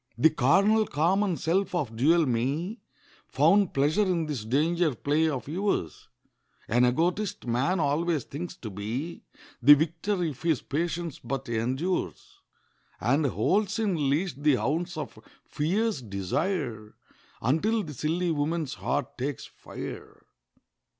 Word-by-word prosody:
The 160 Hz, -, +5 dB
carnal, 200 Hz, -, +3 dB
common 180 Hz, +4 st, +1 dB
self 185 Hz, +3 st, 0 dB
of 130 Hz, -10 st, -2 dB
dual 160 Hz, +7 st, +4 dB
me 140 Hz, -, -1 dB, 0.5 s
Found 200 Hz, -2 st, +3 dB
pleasure 145 Hz, +8 st, +2 dB
in 180 Hz, -5 st, +1 dB
this 145 Hz, -8 st, -4 dB
danger 155 Hz, +5 st, +1 dB
play 150 Hz, +6 st, +1 dB
of 135 Hz, -4 st, -4 dB
yours. 175 Hz, -, -2 dB, 0.6 s
(An 120 Hz, +3 st, +3 dB
egotist, 175 Hz, +10 st, 0 dB
man 130 Hz, +10 st, +1 dB
always 155 Hz, +1 st, +1 dB
thinks 175 Hz, +5 st, -7 dB
to 110 Hz, -, -7 dB
be 115 Hz, -, -4 dB, 0.4 s
The 145 Hz, +4 st, +9 dB
victor, 165 Hz, +5 st, -1 dB
if 150 Hz, -6 st, -4 dB
his 160 Hz, -6 st, +1 dB
patience 165 Hz, +1 st, -3 dB
but 135 Hz, +2 st, -4 dB
endures, 130 Hz, +11 st, -2 dB, 0.6 s
And 140 Hz, +6 st, +2 dB
holds 200 Hz, -, +1 dB
in 180 Hz, -11 st, 0 dB
leash 170 Hz, +7 st, 0 dB
the 145 Hz, 0 st, +2 dB
hounds 165 Hz, +7 st, -1 dB
of 145 Hz, -7 st, -6 dB, 0.3 s
fierce 190 Hz, +3 st, -1 dB
desire, 110 Hz, -, -3 dB, 0.4 s
Until 205 Hz, -, +1 dB
the 150 Hz, -, -7 dB
silly 165 Hz, +6 st, -1 dB
woman's 155 Hz, -1 st, -1 dB
heart 125 Hz, -, -3 dB
takes 140 Hz, +2 st, -3 dB
fire.) -, -, -9 dB
155 Hz, 130 wpm, -27 LUFS, 135-175 Hz, 0.6 s, The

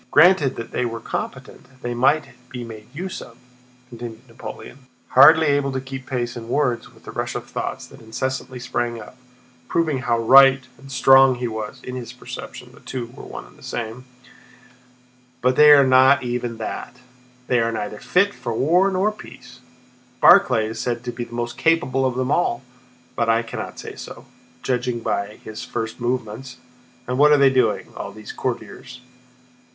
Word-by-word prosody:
Granted 165 Hz, -6 st, +5 dB
that 115 Hz, -, -8 dB, 0.2 s
were 115 Hz, -, -5 dB
they -, -, -22 dB
competent 130 Hz, 0 st, -7 dB
they 120 Hz, -, -2 dB
might 135 Hz, +4 st, +2 dB, 0.2 s
be 125 Hz, -2 st, -6 dB
made 110 Hz, -2 st, -10 dB
use 180 Hz, +7 st, -6 dB
of," 115 Hz, -, -13 dB, 0.5 s
continued 120 Hz, +1 st, -9 dB
Napoleon—hardly 130 Hz, +5 st, +2 dB
able 140 Hz, -1 st, +1 dB
to 130 Hz, -, -1 dB
keep 130 Hz, 0 st, -8 dB
pace 120 Hz, -2 st, -3 dB
in 115 Hz, -1 st, -8 dB
words 125 Hz, -4 st, 0 dB
with -, -, -21 dB
the -, -, -8 dB
rush -, -, -4 dB
of -, -, -4 dB
thoughts -, -, -5 dB
that -, -, -15 dB
incessantly 130 Hz, +3 st, -4 dB
sprang 120 Hz, -1 st, -3 dB
up, 125 Hz, -, -12 dB, 0.5 s
proving 160 Hz, -5 st, 0 dB
how 120 Hz, -2 st, 0 dB
right 135 Hz, +3 st, +7 dB, 0.2 s
and 135 Hz, 0 st, -13 dB
strong 135 Hz, +1 st, +6 dB
he 125 Hz, 0 st, -3 dB
was 110 Hz, +3 st, -6 dB
(in 125 Hz, -, -6 dB
his 125 Hz, -2 st, -7 dB
perception -, -, -9 dB
the -, -, -17 dB
two 120 Hz, -3 st, -6 dB
were -, -, -10 dB
one -, -, -9 dB
and -, -, -19 dB
the -, -, -19 dB
same)—"but 120 Hz, +2 st, -6 dB, 1.5 s
they 150 Hz, +2 st, +7 dB
are 140 Hz, -2 st, +8 dB
not 130 Hz, +1 st, +5 dB
even 120 Hz, -1 st, -3 dB
that! 115 Hz, +2 st, -6 dB, 0.5 s
They 125 Hz, -1 st, +2 dB
are 115 Hz, 0 st, +1 dB
neither 105 Hz, -1 st, -5 dB
fit 200 Hz, +3 st, +2 dB
for 115 Hz, -, -5 dB
war 175 Hz, +10 st, +3 dB
nor 195 Hz, +3 st, +1 dB
peace! 125 Hz, -11 st, -13 dB, 0.6 s
Barclay 115 Hz, -4 st, +6 dB
is 110 Hz, +1 st, -5 dB
said 120 Hz, -1 st, -2 dB
to 125 Hz, -, -4 dB
be 120 Hz, 0 st, -5 dB
the 120 Hz, -, -11 dB
most 120 Hz, 0 st, -4 dB
capable 135 Hz, -6 st, +2 dB
of 125 Hz, -, -3 dB
them 130 Hz, +1 st, -1 dB
all, 130 Hz, -7 st, +1 dB, 0.5 s
but 115 Hz, -1 st, 0 dB
I 115 Hz, +1 st, +3 dB
cannot 115 Hz, -, -7 dB
say -, -, -8 dB
so, -, -, -10 dB, 0.4 s
judging 125 Hz, -2 st, -1 dB
by 100 Hz, -1 st, -2 dB
his 110 Hz, 0 st, -7 dB
first 110 Hz, +2 st, -5 dB
movements. 125 Hz, +1 st, -3 dB, 0.5 s
And 125 Hz, +2 st, -2 dB
what 150 Hz, +1 st, +6 dB
are 150 Hz, -, +6 dB
they 140 Hz, -1 st, +5 dB
doing, 115 Hz, -6 st, +1 dB
all -, -, -6 dB
these 110 Hz, 0 st, -10 dB
courtiers? 125 Hz, 0 st, -6 dB
125 Hz, 175 wpm, -22 LUFS, 115-135 Hz, 1.5 s, are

